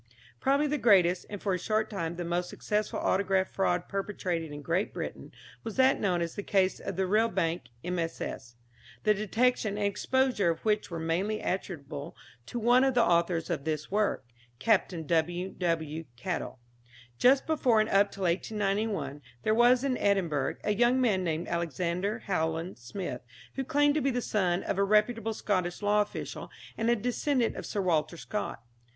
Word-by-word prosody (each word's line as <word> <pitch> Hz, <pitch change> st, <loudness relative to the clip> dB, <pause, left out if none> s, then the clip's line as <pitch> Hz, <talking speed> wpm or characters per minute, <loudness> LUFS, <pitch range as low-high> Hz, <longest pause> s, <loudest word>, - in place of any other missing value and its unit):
Probably 280 Hz, +2 st, +2 dB
the 300 Hz, 0 st, 0 dB
greatest, 185 Hz, -5 st, +4 dB
and 205 Hz, -, -5 dB
for 195 Hz, -1 st, -1 dB
a 180 Hz, -, -1 dB
short 215 Hz, +4 st, 0 dB
time 170 Hz, -5 st, -3 dB
the 175 Hz, 0 st, -4 dB
most 175 Hz, +1 st, -1 dB
successful 210 Hz, 0 st, -2 dB
autograph 190 Hz, -1 st, +1 dB
fraud 180 Hz, -2 st, 0 dB
perpetrated 185 Hz, -5 st, -3 dB
in 145 Hz, 0 st, -8 dB
Great 175 Hz, +7 st, -1 dB
Britain -, -, -6 dB, 0.3 s
was 225 Hz, -2 st, -5 dB
that 265 Hz, 0 st, +4 dB
known 180 Hz, -4 st, +1 dB
as 170 Hz, -, -4 dB
the -, -, -4 dB
case 190 Hz, -2 st, +1 dB
of 195 Hz, -, -5 dB
the 190 Hz, +1 st, +1 dB
Rillbank 185 Hz, -, +1 dB, 0.2 s
MSS., 165 Hz, -8 st, -4 dB, 0.5 s
the 215 Hz, -, +4 dB
detection 215 Hz, +1 st, +1 dB
and 205 Hz, -, 0 dB
exposure 210 Hz, 0 st, +1 dB
of 165 Hz, -, -2 dB
which 210 Hz, -1 st, +1 dB
were 170 Hz, -, -4 dB
mainly 180 Hz, +7 st, -1 dB
attributable 150 Hz, -5 st, -4 dB, 0.3 s
to -, -, -5 dB
one 240 Hz, +3 st, +4 dB
of 265 Hz, -1 st, +2 dB
the 240 Hz, -, +5 dB
authors 170 Hz, -2 st, +1 dB
of 155 Hz, -5 st, -2 dB
this 155 Hz, +1 st, -3 dB
work 210 Hz, -7 st, 0 dB, 0.3 s
(Capt. 225 Hz, -, +3 dB, 0.2 s
W. 175 Hz, +4 st, 0 dB
W. 165 Hz, -2 st, -2 dB
Caddell). 125 Hz, -, -4 dB, 0.6 s
Just 265 Hz, +2 st, +5 dB
before, 260 Hz, -8 st, +3 dB
and 215 Hz, -, +2 dB
up 200 Hz, -1 st, +3 dB
till 195 Hz, -, -6 dB
1891, 195 Hz, -3 st, -1 dB, 0.2 s
there 215 Hz, -, +2 dB
was 240 Hz, +2 st, +5 dB
in 265 Hz, -3 st, 0 dB
Edinburgh 175 Hz, -9 st, +1 dB
a 210 Hz, -, +1 dB
young 240 Hz, +4 st, +3 dB
man 210 Hz, -7 st, +2 dB
named 165 Hz, 0 st, -2 dB
Alexander 175 Hz, +5 st, -2 dB
Howland 165 Hz, -, -2 dB
Smith, 125 Hz, +2 st, -5 dB, 0.3 s
who 270 Hz, -, -2 dB
claimed 290 Hz, +1 st, +3 dB
to 305 Hz, -, +1 dB
be 275 Hz, -, +2 dB
the 245 Hz, -1 st, 0 dB
son 185 Hz, -6 st, 0 dB
of 195 Hz, -, -2 dB
a -, -, +4 dB
reputable 220 Hz, +2 st, +2 dB
Scottish 185 Hz, -2 st, -1 dB
law 205 Hz, +1 st, +4 dB
official, 205 Hz, -, -5 dB, 0.3 s
and 225 Hz, +1 st, 0 dB
a 240 Hz, -, +5 dB
descendant 245 Hz, +2 st, 0 dB
of -, -, -6 dB
Sir 205 Hz, -, -2 dB
Walter 170 Hz, -1 st, +1 dB
Scott. 185 Hz, -, -4 dB
195 Hz, 175 wpm, -29 LUFS, 170-220 Hz, 0.6 s, the